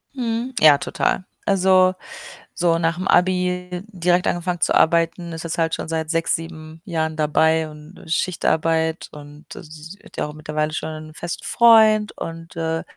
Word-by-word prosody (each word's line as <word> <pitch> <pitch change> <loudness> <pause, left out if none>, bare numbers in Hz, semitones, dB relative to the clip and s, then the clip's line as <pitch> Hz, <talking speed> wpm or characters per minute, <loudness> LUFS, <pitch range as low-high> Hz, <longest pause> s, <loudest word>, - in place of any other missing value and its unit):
Mhm, 240 +1 -3
ja, 150 -2 +7
total. 185 - -1 0.2
Also, 185 -1 +4 0.6
so 170 -2 +1
nach'm 170 +3 -1
Abi 180 0 +1
direkt 180 -3 0
angefangen 175 0 -2
zu - - +2
arbeiten, 170 +1 +2
ist 165 - -6
jetzt 165 0 -4
halt 165 -1 0
schon - - -7
seit 160 -1 -2
6, 165 0 +1
7 160 -1 -9
Jahren 160 -3 -2
dabei 160 +1 +2
und, 150 +4 -14
äh, - - -15
Schichtarbeit 160 -1 0
und, 145 +1 -12
äh, - - -9
sie 160 +5 -12
hat - - -16
ja - - -1
auch 150 - -9
mittlerweile 155 0 -3
schon 160 - -3
einen 155 0 -9
festen 170 +1 -6
Freund 220 -3 +5
und, 165 0 -8
äh, 165 0 -2
165 Hz, 165 wpm, -21 LUFS, 160-180 Hz, 0.6 s, ja